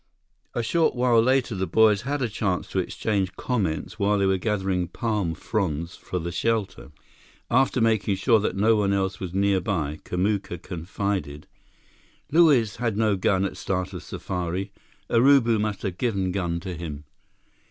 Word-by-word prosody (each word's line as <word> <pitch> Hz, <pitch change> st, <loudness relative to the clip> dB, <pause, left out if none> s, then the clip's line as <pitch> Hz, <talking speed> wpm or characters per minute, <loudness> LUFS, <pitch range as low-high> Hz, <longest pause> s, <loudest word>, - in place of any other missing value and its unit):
A 120 Hz, -, 0 dB
short 160 Hz, +7 st, +2 dB
while 120 Hz, -2 st, +4 dB
later, 130 Hz, 0 st, +2 dB
the 95 Hz, -1 st, -2 dB
boys 105 Hz, +2 st, +4 dB
had 140 Hz, +1 st, -2 dB
a -, -, +1 dB
chance 100 Hz, -4 st, -1 dB
to -, -, -1 dB
exchange 100 Hz, -4 st, -1 dB
comments 95 Hz, -5 st, -2 dB
while 105 Hz, +1 st, +2 dB
they 100 Hz, -, +2 dB
were 95 Hz, -1 st, +2 dB
gathering 95 Hz, -3 st, -1 dB
palm 105 Hz, -8 st, -2 dB
fronds 85 Hz, -6 st, -2 dB
for 90 Hz, -, -5 dB
the 85 Hz, 0 st, -3 dB
shelter. 100 Hz, -, -2 dB, 0.6 s
After 130 Hz, +1 st, +3 dB
making 110 Hz, -3 st, +2 dB
sure 110 Hz, +4 st, +3 dB
that 105 Hz, -, -1 dB
no 110 Hz, +3 st, +4 dB
one 100 Hz, -2 st, +1 dB
else 95 Hz, -1 st, -1 dB
was 90 Hz, -1 st, -5 dB
nearby, 95 Hz, -6 st, 0 dB
Kamuka 95 Hz, 0 st, -1 dB
confided: 90 Hz, -3 st, -4 dB, 0.9 s
"Luiz 145 Hz, -10 st, +4 dB
had 115 Hz, -3 st, -1 dB
no 110 Hz, -2 st, +2 dB
gun 95 Hz, 0 st, +1 dB
at 95 Hz, -1 st, -4 dB
start 95 Hz, 0 st, -2 dB
of 90 Hz, -, -6 dB
safari. 90 Hz, +2 st, -4 dB, 0.4 s
Urubu 120 Hz, -2 st, +4 dB
must 105 Hz, -1 st, -2 dB
have 95 Hz, -3 st, -4 dB
given 100 Hz, -6 st, 0 dB
gun 85 Hz, -3 st, -2 dB
to 95 Hz, 0 st, -5 dB
him." 75 Hz, -3 st, -6 dB
100 Hz, 160 wpm, -25 LUFS, 90-115 Hz, 0.9 s, while